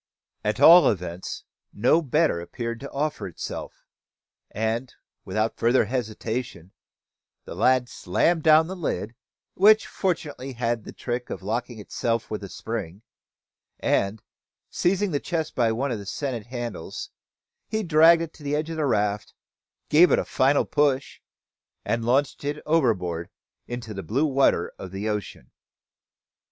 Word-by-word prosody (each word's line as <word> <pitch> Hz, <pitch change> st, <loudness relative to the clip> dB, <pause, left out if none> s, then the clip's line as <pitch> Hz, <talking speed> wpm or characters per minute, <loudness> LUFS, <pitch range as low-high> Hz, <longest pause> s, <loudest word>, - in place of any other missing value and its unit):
At 105 Hz, +4 st, -1 dB
all 170 Hz, +5 st, +9 dB
events, 90 Hz, -3 st, -4 dB, 0.3 s
no 125 Hz, +10 st, +3 dB
better 150 Hz, -, +1 dB
appeared 115 Hz, +6 st, -5 dB
to 140 Hz, -, -7 dB
offer 150 Hz, -3 st, -2 dB
itself; 85 Hz, -, -7 dB, 0.6 s
and, 110 Hz, +4 st, -2 dB, 0.3 s
without 110 Hz, +1 st, -1 dB
further 120 Hz, +1 st, +3 dB
hesitation, 110 Hz, -5 st, -4 dB, 0.7 s
the -, -, -7 dB
lad 125 Hz, +6 st, +3 dB
slammed 160 Hz, -, 0 dB
down 155 Hz, +1 st, +6 dB
the 185 Hz, +3 st, -6 dB
lid, 115 Hz, -, -3 dB, 0.4 s
which 215 Hz, +3 st, +5 dB
fortunately 150 Hz, -7 st, -3 dB
had 115 Hz, -2 st, -1 dB
the -, -, -8 dB
trick 120 Hz, 0 st, -4 dB
of -, -, -6 dB
locking 115 Hz, +3 st, -3 dB
itself 115 Hz, +2 st, -2 dB
with 105 Hz, -1 st, -4 dB
a 100 Hz, -, -7 dB
spring, 105 Hz, -3 st, -6 dB, 0.8 s
and, 100 Hz, +2 st, 0 dB, 0.5 s
seizing 190 Hz, +2 st, +1 dB
the 145 Hz, -, 0 dB
chest 160 Hz, -1 st, -3 dB
by 115 Hz, -3 st, +2 dB
one 130 Hz, +4 st, -1 dB
of 115 Hz, -, -2 dB
the 100 Hz, -, -9 dB
sennit 120 Hz, -3 st, -4 dB
handles, 120 Hz, -8 st, -6 dB, 0.6 s
he 220 Hz, 0 st, -2 dB
dragged 165 Hz, 0 st, +6 dB
it 165 Hz, -, -7 dB
to -, -, -17 dB
the 145 Hz, 0 st, -1 dB
edge 155 Hz, +2 st, -2 dB
of 165 Hz, -, -5 dB
the 150 Hz, -2 st, +1 dB
raft, 105 Hz, -3 st, -1 dB, 0.5 s
gave 170 Hz, +4 st, +7 dB
it -, -, +5 dB
a -, -, -1 dB
final 135 Hz, +2 st, +2 dB
push, 140 Hz, -2 st, 0 dB, 0.6 s
and 115 Hz, 0 st, -1 dB
launched 130 Hz, +5 st, +1 dB
it 145 Hz, +1 st, -2 dB
overboard 95 Hz, -, +1 dB, 0.4 s
into 120 Hz, -3 st, -6 dB
the 95 Hz, -, -5 dB
blue 130 Hz, +10 st, 0 dB
water 135 Hz, -, +2 dB
of 95 Hz, -, -7 dB
the 95 Hz, +3 st, -4 dB
ocean. 105 Hz, -11 st, -5 dB
120 Hz, 145 wpm, -25 LUFS, 105-150 Hz, 0.8 s, all